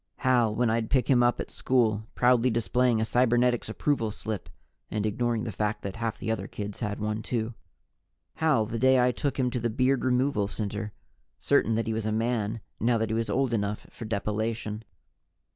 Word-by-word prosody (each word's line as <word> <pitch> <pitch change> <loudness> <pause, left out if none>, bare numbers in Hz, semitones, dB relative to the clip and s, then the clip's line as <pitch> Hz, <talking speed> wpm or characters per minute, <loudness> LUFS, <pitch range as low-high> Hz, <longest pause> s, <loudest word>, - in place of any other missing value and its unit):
Hal, 120 -4 +2
when 120 -1 +2
I'd 115 -1 0
pick 130 -2 +2
him 130 -3 +4
up 120 0 +3
at - - -5
school, 110 -4 +1
proudly 125 0 +4
displaying 115 +1 +2
a 110 - +1
Cybernetics 120 0 +2
Approval 115 -1 0
Slip 110 -1 -5 0.4
(and 105 -1 -2
ignoring 115 +1 0
the 115 - -3
fact 105 +2 -2
that 100 +1 -5
half 115 -1 -2
the 110 - -3
other 110 - -2
kids 105 -1 -6
had 105 -3 -3
one, 105 +1 -2
too). 115 0 -2 0.8
Hal 150 -9 +3
the 115 +2 -4
day 130 +1 +5
I 125 0 +4
took 140 +3 -2
him 125 -2 +1
to 125 - -1
the 120 0 0
Beard 130 +3 +1
Removal 125 -4 +1
Center, 105 0 -4 0.5
certain 110 +2 +2
that 115 - 0
he 110 - -1
was 110 -1 -2
a - - 0
man, 110 -1 -1 0.2
now 115 +1 +2
that 110 -1 -1
he - - 0
was 115 0 -1
old 130 -2 +1
enough 105 -1 -1
for 115 - -8
depilation. 110 +1 -2
115 Hz, 195 wpm, -27 LUFS, 110-125 Hz, 0.8 s, day